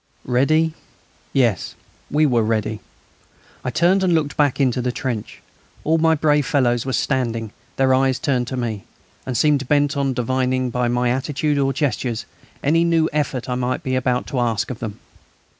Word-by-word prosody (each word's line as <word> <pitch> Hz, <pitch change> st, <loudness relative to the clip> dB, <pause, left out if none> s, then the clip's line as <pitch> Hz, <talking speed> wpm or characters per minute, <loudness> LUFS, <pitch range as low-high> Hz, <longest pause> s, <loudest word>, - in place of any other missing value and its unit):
Ready? 155 Hz, +6 st, +2 dB, 0.6 s
Yes, 120 Hz, -8 st, +1 dB, 0.3 s
we 155 Hz, +2 st, +3 dB
were 120 Hz, -5 st, +3 dB
ready. 110 Hz, -1 st, -1 dB, 0.8 s
I -, -, -1 dB
turned 180 Hz, +8 st, +3 dB
and 180 Hz, -3 st, +3 dB
looked 150 Hz, -2 st, 0 dB
back 145 Hz, -3 st, +2 dB
into 130 Hz, -2 st, +2 dB
the 125 Hz, 0 st, -1 dB
trench. 120 Hz, -4 st, -5 dB, 0.4 s
All 160 Hz, +1 st, +2 dB
my 160 Hz, 0 st, +4 dB
brave 150 Hz, -2 st, +2 dB
fellows 120 Hz, -3 st, +1 dB
were 130 Hz, -, -1 dB
standing, 115 Hz, -6 st, -1 dB, 0.2 s
their 130 Hz, -1 st, +3 dB
eyes 130 Hz, 0 st, +2 dB
turned 130 Hz, -5 st, 0 dB
to 130 Hz, -, -4 dB
me, 110 Hz, -5 st, -3 dB, 0.4 s
and 125 Hz, -3 st, -1 dB
seemed 145 Hz, -2 st, +2 dB
bent 145 Hz, 0 st, +2 dB
on 135 Hz, -2 st, 0 dB
divining 130 Hz, +1 st, 0 dB
by 125 Hz, 0 st, 0 dB
my 120 Hz, 0 st, +1 dB
attitude 145 Hz, +3 st, 0 dB
or 135 Hz, -1 st, +2 dB
gestures 130 Hz, -4 st, -2 dB, 0.4 s
any 165 Hz, +4 st, +3 dB
new 165 Hz, -1 st, +2 dB
effort 145 Hz, -4 st, -1 dB
I 125 Hz, -, -1 dB
might 125 Hz, +1 st, -2 dB
be 130 Hz, -, -2 dB
about 125 Hz, -1 st, 0 dB
to 130 Hz, -, -2 dB
ask 115 Hz, -1 st, 0 dB
of 120 Hz, -, -7 dB
them. 110 Hz, -2 st, -5 dB
130 Hz, 175 wpm, -21 LUFS, 125-145 Hz, 0.8 s, my